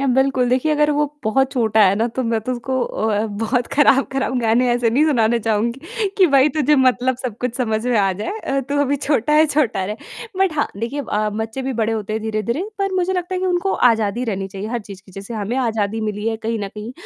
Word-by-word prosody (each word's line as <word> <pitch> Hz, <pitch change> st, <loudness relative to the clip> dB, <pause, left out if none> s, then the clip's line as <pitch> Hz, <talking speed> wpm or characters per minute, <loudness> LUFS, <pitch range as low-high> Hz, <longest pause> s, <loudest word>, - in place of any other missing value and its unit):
अ, 275 Hz, -, 0 dB
बिल्कुल। 265 Hz, -2 st, +2 dB
देखिए 260 Hz, +5 st, +1 dB
अगर 300 Hz, 0 st, +2 dB
वो 295 Hz, -, +3 dB, 0.2 s
बहुत 265 Hz, +5 st, +2 dB
छोटा 220 Hz, -4 st, +2 dB
है 190 Hz, 0 st, +4 dB
ना, 230 Hz, -, +3 dB
तो 260 Hz, -, 0 dB
मैं 230 Hz, -1 st, 0 dB
तो 250 Hz, +4 st, -3 dB
उसको 260 Hz, +1 st, -2 dB
अ, 215 Hz, -2 st, -1 dB, 0.2 s
बहुत 240 Hz, +2 st, 0 dB
ख़राब-ख़राब 270 Hz, -2 st, +2 dB
गाने 235 Hz, +2 st, +2 dB
ऐसे 240 Hz, -1 st, +1 dB
नहीं 275 Hz, +7 st, +3 dB
सुनाना 235 Hz, -5 st, +2 dB
चाहूँगी 270 Hz, -, -1 dB
कि 375 Hz, -, +7 dB
भाई 275 Hz, +1 st, +6 dB
तुझे 300 Hz, -1 st, +3 dB
मतलब 255 Hz, 0 st, +2 dB
सब 245 Hz, -5 st, -4 dB
कुछ 250 Hz, -2 st, -1 dB
समझ 220 Hz, -3 st, -1 dB
में 245 Hz, -2 st, +2 dB
आ 195 Hz, -1 st, +2 dB
जाए 215 Hz, -, -3 dB
अ, 275 Hz, -9 st, -1 dB
"तू 285 Hz, -, -1 dB
अभी 285 Hz, 0 st, +1 dB
छोटा 285 Hz, -1 st, +1 dB
है, 310 Hz, +1 st, +5 dB
छोटा 265 Hz, -10 st, 0 dB
रह," 210 Hz, +3 st, -4 dB, 0.4 s
बट 385 Hz, -3 st, +2 dB
हाँ, 295 Hz, -1 st, 0 dB
देखिए 235 Hz, +7 st, -3 dB
अ, 215 Hz, -5 st, -1 dB
बच्चे 225 Hz, +4 st, -4 dB
भी 265 Hz, +1 st, -2 dB
बड़े 225 Hz, 0 st, +1 dB
होते 215 Hz, -1 st, -3 dB
हैं 220 Hz, 0 st, -2 dB
धीरे-धीरे 220 Hz, -, -2 dB, 0.2 s
पर 390 Hz, -1 st, -1 dB
मुझे 370 Hz, 0 st, +1 dB
लगता 360 Hz, 0 st, -2 dB
है 365 Hz, -, -2 dB
कि 375 Hz, -, 0 dB
उनको 365 Hz, +1 st, 0 dB, 0.2 s
आज़ादी 225 Hz, +1 st, -1 dB
रहनी 195 Hz, -4 st, -3 dB
चाहिए 195 Hz, +2 st, -6 dB
हर 240 Hz, +1 st, -2 dB
चीज़ 195 Hz, -1 st, -10 dB
की, 190 Hz, -, -16 dB
जैसे 195 Hz, +5 st, -8 dB
हमें 215 Hz, +3 st, -3 dB
आज़ादी 225 Hz, -4 st, -1 dB
मिली 210 Hz, 0 st, -3 dB
है 225 Hz, -, -2 dB
कहीं 225 Hz, +1 st, -3 dB
न 195 Hz, -, -5 dB
कहीं 215 Hz, +3 st, -7 dB
240 Hz, 240 wpm, -20 LUFS, 220-275 Hz, 0.4 s, कि